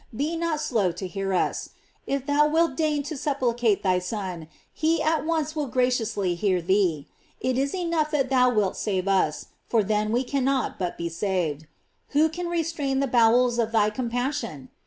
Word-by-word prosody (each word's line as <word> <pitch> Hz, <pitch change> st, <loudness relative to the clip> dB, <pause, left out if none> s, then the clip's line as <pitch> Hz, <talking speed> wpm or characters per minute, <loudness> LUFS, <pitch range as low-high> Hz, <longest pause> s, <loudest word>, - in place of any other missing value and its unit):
Be 300 Hz, +7 st, -1 dB
not 330 Hz, -2 st, -1 dB
slow 215 Hz, -11 st, +1 dB
to 180 Hz, +3 st, -6 dB
hear 195 Hz, +1 st, -3 dB
us. 185 Hz, -, 0 dB, 0.4 s
If 275 Hz, -1 st, -1 dB
thou 290 Hz, +1 st, +3 dB
wilt 320 Hz, -2 st, +2 dB
deign 300 Hz, -2 st, 0 dB
to 290 Hz, +3 st, -5 dB
supplicate 245 Hz, -6 st, 0 dB
thy 185 Hz, -2 st, +2 dB
Son, 180 Hz, -4 st, -5 dB, 0.3 s
he 320 Hz, +1 st, +1 dB
at 310 Hz, -1 st, +1 dB
once 315 Hz, -2 st, -1 dB
will 300 Hz, -2 st, -1 dB
graciously 230 Hz, -7 st, 0 dB
hear 185 Hz, +1 st, +1 dB
thee. 175 Hz, -4 st, +1 dB, 0.3 s
It 255 Hz, 0 st, 0 dB
is 275 Hz, +5 st, 0 dB
enough 335 Hz, -4 st, 0 dB
that 275 Hz, -4 st, 0 dB
thou 250 Hz, -1 st, +5 dB
wilt 210 Hz, -5 st, +1 dB
save 190 Hz, -3 st, -2 dB
us, 185 Hz, -6 st, +1 dB, 0.2 s
for 225 Hz, -3 st, +2 dB
then 210 Hz, +1 st, 0 dB
we 245 Hz, +3 st, +1 dB
cannot 270 Hz, 0 st, -1 dB
but 180 Hz, -2 st, -3 dB
be 170 Hz, -, -3 dB
saved. 165 Hz, -4 st, -2 dB, 0.5 s
Who 315 Hz, +2 st, +5 dB
can 350 Hz, +2 st, -4 dB
restrain 325 Hz, -5 st, -1 dB
the 275 Hz, -, +2 dB
bowels 240 Hz, 0 st, +3 dB
of 225 Hz, -1 st, +1 dB
thy 215 Hz, -2 st, +3 dB
compassion? 235 Hz, -, -3 dB
245 Hz, 180 wpm, -25 LUFS, 195-295 Hz, 0.5 s, thou